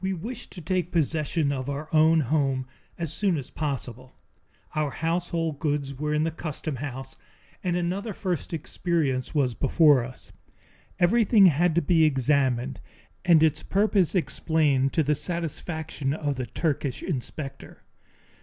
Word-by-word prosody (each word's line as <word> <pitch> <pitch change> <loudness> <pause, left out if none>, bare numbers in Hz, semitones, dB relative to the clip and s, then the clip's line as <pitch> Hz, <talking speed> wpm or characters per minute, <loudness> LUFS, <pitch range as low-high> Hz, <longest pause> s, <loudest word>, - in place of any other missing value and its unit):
We 190 0 0
wished 225 +7 -7
to 180 - -8
take 180 +1 -1
possession 155 -1 0
of 135 -1 -3
our 145 +2 -4
own 160 +1 +5
home 135 -2 0 0.3
as 165 -3 -4
soon 185 +1 +1
as 135 - -7
possible. 130 -4 -5 0.6
Our 155 -1 0
household 165 -1 -2
goods 145 -3 -1
were 150 +3 -3
in 150 0 +2
the 165 - 0
customhouse, 145 -4 -5 0.5
and 180 -2 0
another 185 +5 -2
first 180 -4 -3
experience 155 -5 -1
was 135 -4 +2
before 145 0 +4
us. 125 +1 -11 0.7
Everything 205 +2 +5
had 170 0 +4
to 170 - +2
be 160 +1 +4
examined 135 -3 +1 0.4
and 170 -3 +5
its 155 -1 +2
purpose 200 -2 +2
explained 150 -6 +1
to 160 - +3
the 150 +1 +2
satisfaction 160 -3 -3
of 145 -2 -1
the 130 -2 -4
Turkish 140 -2 -2
inspector. 140 -2 -6
155 Hz, 140 wpm, -26 LUFS, 140-170 Hz, 0.7 s, own